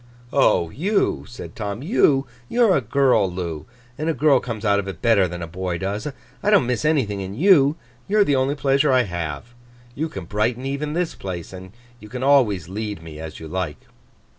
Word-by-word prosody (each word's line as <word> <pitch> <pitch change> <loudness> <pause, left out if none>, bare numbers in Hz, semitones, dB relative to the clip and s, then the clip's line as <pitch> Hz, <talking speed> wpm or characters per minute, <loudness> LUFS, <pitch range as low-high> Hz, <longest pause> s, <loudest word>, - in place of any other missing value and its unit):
'Oh! 85 -1 +3
You,' 195 - 0
said 125 - -10
Tom; 105 +3 -4
'you 145 - +3 0.3
are 225 -6 +5
a - - +2
girl, 125 -5 +2
Loo, 85 -2 -5 0.3
and 155 +2 -1
a 160 - 0
girl 140 0 +4
comes 115 -4 -6
out 100 -1 +3
of 100 - -4
it 95 - -6
better 110 -5 +3
than 85 0 -6
a - - -5
boy 90 +1 -3
does. 100 - -3 0.3
I 205 - +1
don't 205 -11 +5
miss 125 +1 -1
anything 135 -10 +1
in 95 +1 -6
you. 150 - +5 0.3
You 210 - +1
are 210 - +7
the 145 - +2
only 135 +2 +1
pleasure 140 +1 +2
I 130 -1 +4
have—you 120 - -6
can 120 - -7
brighten 110 +7 -1
even 140 +2 -3
this 175 0 -1
place—and 95 +1 -7 0.3
you 105 - -12
can 125 +2 -5
always 120 - +3
lead 105 -2 -5
me 80 -2 -9
as 80 -1 -8
you 80 - -8
like. 90 -2 -3
115 Hz, 195 wpm, -22 LUFS, 95-140 Hz, 0.3 s, are